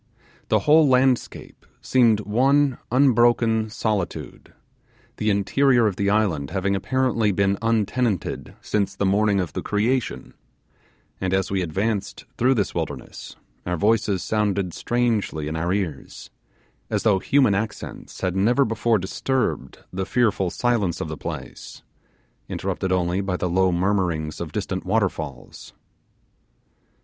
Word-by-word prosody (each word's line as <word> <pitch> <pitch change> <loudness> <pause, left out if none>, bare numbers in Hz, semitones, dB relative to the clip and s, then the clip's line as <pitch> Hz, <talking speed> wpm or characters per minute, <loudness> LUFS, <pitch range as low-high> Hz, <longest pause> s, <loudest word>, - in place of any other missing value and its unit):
The - - +2
whole 155 0 +5
landscape 130 -1 0 0.2
seemed 115 -5 +3
one 130 +6 +2
unbroken 120 -4 +3
solitude, 105 -4 -3 0.7
the 110 - 0
interior 120 +5 +3
of 105 -4 0
the 100 +1 0
island 100 -10 +1
having 100 +1 -1
apparently 115 0 +1
been 100 +1 +1
untenanted 115 -1 -1
since 100 -2 -1
the 100 - -1
morning 100 +1 +2
of 90 -5 -3
the - - -3
creation; 115 +5 -1 0.9
and 95 0 0
as 95 0 -1
we 95 -1 0
advanced 100 +4 -2
through 130 +2 +2
this 100 -5 -1
wilderness, - - -6 0.3
our 90 0 -2
voices 105 -1 +1
sounded 100 -4 -1
strangely 115 -10 -1
in 80 - -3
our 85 +2 -1
ears, 90 -9 -4 0.6
as - - -1
though 105 -4 +3
human 130 -1 +3
accents 105 +2 -5
had 95 -1 -1
never 120 +8 +3
before 115 0 +1
disturbed 125 +7 -2
the 95 +1 -3
fearful 105 -6 +1
silence 105 -5 0
of 80 - -4
the 80 - -4
place, - - -8 0.7
interrupted 95 - -3
only 90 +1 +1
by 95 -2 -2
the 90 - -1
low 95 +1 +2
murmurings 85 -4 -1
of - - -5
distant - - -3
waterfalls. - - -3
105 Hz, 130 wpm, -23 LUFS, 95-120 Hz, 0.9 s, whole